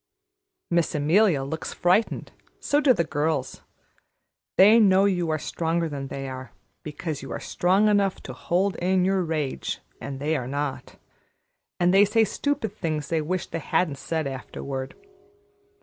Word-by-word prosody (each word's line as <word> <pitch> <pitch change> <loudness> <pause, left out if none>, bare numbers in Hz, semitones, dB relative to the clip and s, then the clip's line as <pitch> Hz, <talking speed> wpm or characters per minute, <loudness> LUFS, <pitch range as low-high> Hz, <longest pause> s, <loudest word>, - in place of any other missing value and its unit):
Miss 170 -2 +1
Amelia 155 +1 +3
looks 155 +4 -5
frightened, 185 +5 +1 0.3
so 290 - +1
do 285 - +5
the 170 - +2
girls. 150 -3 -2 1.0
They 210 +5 +8
know 195 -2 +5
you 175 -4 +1
are 155 - +1
stronger 165 +2 -1
than 140 -3 -5
they 135 0 -5
are, 130 -1 -8 0.3
because 155 0 -5
you - - -8
are - - -4
strong 190 +4 +2
enough 200 -2 +2
to - - -7
hold 185 +2 0
in 185 +1 +2
your 190 -1 +1
rage 155 -5 -3 0.2
and 135 -1 -6
they 155 +3 0
are 125 -4 -3
not, 140 +1 -4 0.8
and 175 +1 +3
they 200 +1 +7
say 220 +2 +3
stupid 225 -3 -2
things 155 -7 -3
they 165 -1 +1
wish 180 +4 -2
they 165 - -5
hadn't 155 -3 0
said 160 -2 -2
afterward. 135 0 -6
165 Hz, 155 wpm, -25 LUFS, 145-190 Hz, 1.0 s, They